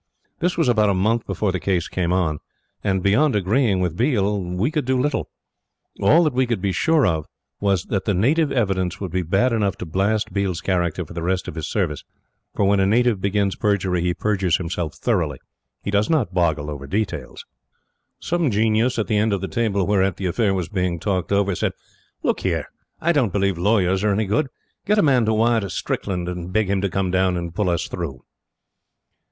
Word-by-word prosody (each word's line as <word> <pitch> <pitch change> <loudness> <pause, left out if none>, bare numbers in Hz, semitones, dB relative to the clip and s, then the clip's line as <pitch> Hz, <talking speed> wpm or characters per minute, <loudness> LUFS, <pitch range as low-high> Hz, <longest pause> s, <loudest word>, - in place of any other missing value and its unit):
This 180 +1 0
was 165 - +2
about 110 -4 +3
a 100 - +2
month 110 +5 +1
before 105 -3 -1
the 90 - -2
case 90 -2 0
came 90 -2 -1
on; 85 -5 0 0.4
and 95 -3 0
beyond 125 +8 +3
agreeing 105 0 +2
with 90 -3 -1
Biel, 105 - +1
we 90 - -1
could 150 -4 -1
do 130 0 +1
little. 145 +2 -1 0.7
All 170 +3 +5
that 155 - +1
we 130 0 +1
could 120 -4 -1
be 100 +1 -1
sure 160 - +2
of 80 -5 0 0.3
was 100 -4 +1
that 100 -3 -2
the 105 - +1
native 145 - +2
evidence 95 -6 0
would 95 -4 -5
be 95 - 0
bad 95 +9 +1
enough 100 -4 +1
to 90 - -6
blast 100 +6 0
Biel's 95 -4 -1
character 90 -1 -1
for 75 - -11
the 85 - -4
rest 95 +2 -1
of - - -5
his 80 -2 -4
service; 85 -9 -2 0.5
for 100 - +2
when 100 0 +3
a 95 - +3
native 115 -1 +2
begins 100 -1 0
perjury 95 -4 0
he 90 0 0
perjures 95 -6 +1
himself 85 -2 -4
thoroughly. 85 - 0 0.5
He 100 - -3
does 105 +1 +1
not 130 - +1
boggle 80 -4 0
over 70 -2 -7
details. 105 +7 -3 0.7
Some 170 -3 0
genius 110 +3 +2
at 110 - 0
the 105 - 0
end 105 0 +2
of 100 - -1
the 95 - -3
table 100 -5 0
whereat 95 -2 +1
the 95 - -4
affair 100 +2 +1
was 90 -4 -2
being 90 -3 -1
talked 95 -2 -2
over, 100 -1 +2
said: - - -1 0.5
"Look - - +1
here! - - -1 0.3
I 170 - +2
don't 135 - +2
believe 100 -1 +1
lawyers 95 +1 +2
are 105 - +3
any 110 +2 0
good. 110 +9 +1 0.4
Get 210 +1 +2
a - - +4
man 130 -6 +4
to 110 - +2
wire 115 +1 +3
to 100 -2 -4
Strickland, 90 0 -3
and 90 0 -5
beg 105 0 +1
him 100 -1 +1
to 100 - 0
come 95 -1 -1
down 95 -1 +2
and 85 -1 -5
pull 100 0 0
us 85 - -1
through." 70 -8 -5
100 Hz, 210 wpm, -22 LUFS, 90-110 Hz, 0.7 s, All